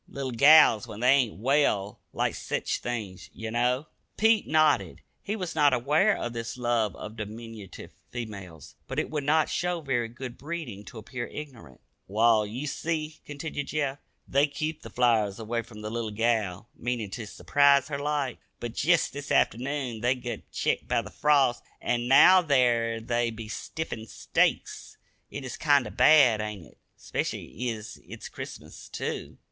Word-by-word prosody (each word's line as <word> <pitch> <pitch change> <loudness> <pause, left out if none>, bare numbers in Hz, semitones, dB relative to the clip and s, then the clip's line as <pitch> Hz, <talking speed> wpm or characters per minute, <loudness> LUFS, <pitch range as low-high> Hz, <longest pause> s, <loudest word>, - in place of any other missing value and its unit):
Little 135 -2 -5
gals, 140 -3 +6
when 105 - -8
they 125 +1 +5
ain't 130 -5 +3
well, 110 -5 +1
like - - 0
sech - - -3
things, 110 -7 -4
ye 110 - -6
know." 125 +4 +1 0.3
Pete 220 -1 +3
nodded. 155 0 +2 0.2
He 210 - -3
was 185 -5 -4
not 145 -2 +4
aware 150 - +3
of 120 - -4
this 115 +1 -5
love 120 -4 0
of 105 +1 -8
diminutive 110 -1 -8 0.2
females, 100 -9 -8
but - - -6
it - - -1
would 150 -2 -2
not 155 +2 +3
show 175 -1 -1
very 130 -6 -1
good 120 +1 -8
breeding 145 - -6
to 120 - -11
appear 120 +2 -6
ignorant. 120 - -10 0.3
"Wall, 110 +1 +3
ye 125 +8 -5
see," 155 +1 -3
continued 145 0 -5
Jeff, 145 -2 -2 0.3
"they 140 +2 +3
kep 155 +2 -4
the - - -9
flowers 115 -5 +2
away 115 +1 -2
from 110 -2 -12
the 105 - -4
little 115 -1 -3
gal, 110 -2 -1
meanin' 120 -4 -3
ter 110 -2 -6
s'prise 140 +5 +3
her 140 -2 -3
like. 145 -3 -2 0.2
But 120 -1 -5
jest 170 +7 +2
this 145 0 -6
afternoon 125 -1 0
they 125 +2 +2
gut 125 -1 -7
ketched - - -1
by - - +1
the - - -10
frost, 140 -5 +3 0.2
an' 120 0 -1
now 185 +8 +8
there 120 -7 +2
they 120 +1 0
be 115 -1 -8
stiffer'n 115 0 -5
stakes. - - -1 0.3
It 140 - -7
is 130 - -6
kinder 145 -4 +3
bad, 135 -9 +6
ain't 105 -5 -6
it - - -21 0.2
'specially 125 +2 -4
ez 110 -2 -7
it's - - -9
Christmas, - - -9
too?" - - -5
120 Hz, 165 wpm, -27 LUFS, 110-145 Hz, 0.3 s, now